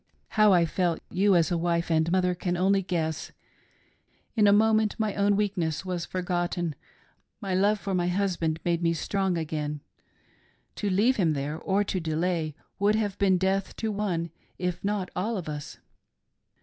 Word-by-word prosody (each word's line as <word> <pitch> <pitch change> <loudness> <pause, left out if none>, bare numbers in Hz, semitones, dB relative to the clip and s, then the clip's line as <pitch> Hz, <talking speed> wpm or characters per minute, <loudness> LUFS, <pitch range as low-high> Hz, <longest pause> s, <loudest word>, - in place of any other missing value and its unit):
How 215 -1 +4
I 175 -2 +5
felt, 170 0 0
you, 195 +1 +3
as 170 0 +3
a 175 - +2
wife 170 0 0
and 160 +1 +2
mother, 180 -1 +2 0.2
only 195 +2 +3
can 185 - -14
guess. 160 -3 -2 1.0
In 210 -3 +4
a - - +7
moment 215 0 +3
my 215 -2 0
own 200 0 +2
weakness 190 -5 -1
was 180 -2 -3
forgotten; 175 -2 -2 0.7
my 195 -2 -3
love 205 +3 +3
for 195 +2 -3
my 175 -1 +1
husband 175 -4 0
made 170 -1 +1
me 170 -1 +2
strong 190 +1 -1
again. 150 -2 -3 1.0
To 205 - -1
leave 210 +7 +3
him 170 -6 +2
there 145 +2 -3
or 200 +3 +1
to 195 -2 -2
delay 160 -1 -1 0.2
would 205 +2 +3
have 210 -3 -1
been 190 -2 +4
death 190 +1 0
to 220 -1 -2
one 180 -6 -2 0.3
if 180 -1 -3
not 200 -2 -1
all 215 +5 -1
of 180 - -6
us. 150 0 -6
180 Hz, 170 wpm, -27 LUFS, 170-200 Hz, 1.0 s, a